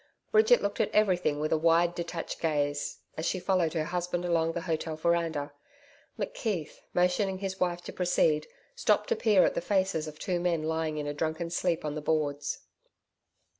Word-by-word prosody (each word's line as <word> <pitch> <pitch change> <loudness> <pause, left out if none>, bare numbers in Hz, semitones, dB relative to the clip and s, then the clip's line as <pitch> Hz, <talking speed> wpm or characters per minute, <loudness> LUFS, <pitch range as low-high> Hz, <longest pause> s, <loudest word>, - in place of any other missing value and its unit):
Bridget 445 +3 +5
looked 200 - -2
at - - +1
everything 180 -8 +2
with 155 +1 -1
a 160 - +2
wide 170 +1 +4
detached 170 -1 -5
gaze, 145 -2 -1 0.2
as 160 - -1
she 185 - 0
followed 180 -3 +1
her 160 -2 0
husband 175 +1 -2
along 165 -1 +1
the 170 - -3
hotel 160 -2 -2
veranda. 160 -3 0 0.6
McKeith, 220 - -3
motioning 185 +2 +1
to - - -14
his 190 -1 -3
wife 175 -1 0
to - - -7
proceed, 160 -4 +2 0.3
stopped 480 - +2
to 470 - +3
peer 210 - +4
at - - +1
the - - -2
faces 190 -4 0
of 155 0 -8
two 180 -1 -1
men 170 -3 0
lying 160 -1 -1
in 150 - -3
a 145 - -2
drunken 160 +3 -2
sleep 175 -2 0
on 150 - -2
the 155 - -4
boards. 150 -2 -1
170 Hz, 185 wpm, -29 LUFS, 155-180 Hz, 0.6 s, Bridget